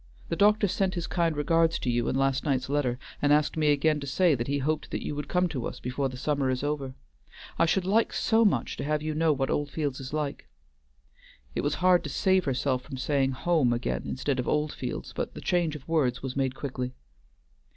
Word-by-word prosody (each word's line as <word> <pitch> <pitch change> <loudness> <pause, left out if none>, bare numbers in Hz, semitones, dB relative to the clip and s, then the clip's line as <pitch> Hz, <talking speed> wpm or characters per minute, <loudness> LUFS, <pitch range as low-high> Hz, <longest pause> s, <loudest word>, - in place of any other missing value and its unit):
The 165 - 0
doctor 205 +2 +4
sent 190 0 0
his 170 -1 -2
kind 170 -4 0
regards 165 +2 +2
to - - -5
you 120 0 0
in - - -1
last 135 0 +1
night's 135 -3 0
letter, 140 -4 0 0.2
and 145 - +3
asked 150 0 +3
me 155 -1 +1
again 150 +1 +2
to 140 - -6
say 170 +4 +3
that 120 -3 -2
he 140 +1 0
hoped 150 +3 -1
that - - -4
you - - -2
would 145 0 -4
come 180 +3 +2
to 130 -7 -3
us - - -7
before 135 +2 -2
the 130 - -8
summer 140 0 0
is 130 +1 -1
over. 145 -3 -2 0.6
I 165 - +4
should 185 +2 +1
like 220 +4 +2
so 225 0 +2
much 205 - +1
to - - -3
have 150 +1 -1
you 155 0 -2
know 160 +1 +2
what 135 -2 0
Oldfields 145 -1 -2
is 135 -1 -7
like." 150 -2 -3 1.0
It - - -1
was 145 +1 0
hard 180 -1 +5
to - - -3
save 185 +6 +2
herself 130 -1 0
from 135 0 -8
saying 135 0 +1
"home" 150 -2 +2
again, 120 +1 -2
instead 130 0 -1
of 125 - -2
Oldfields, 150 -4 -2
but - - -3
the - - -6
change 170 -4 +1
of 145 - -10
words 135 -7 +1
was 130 -1 -4
made 135 -1 0
quickly. 130 -2 -4
145 Hz, 225 wpm, -28 LUFS, 135-165 Hz, 1.0 s, hard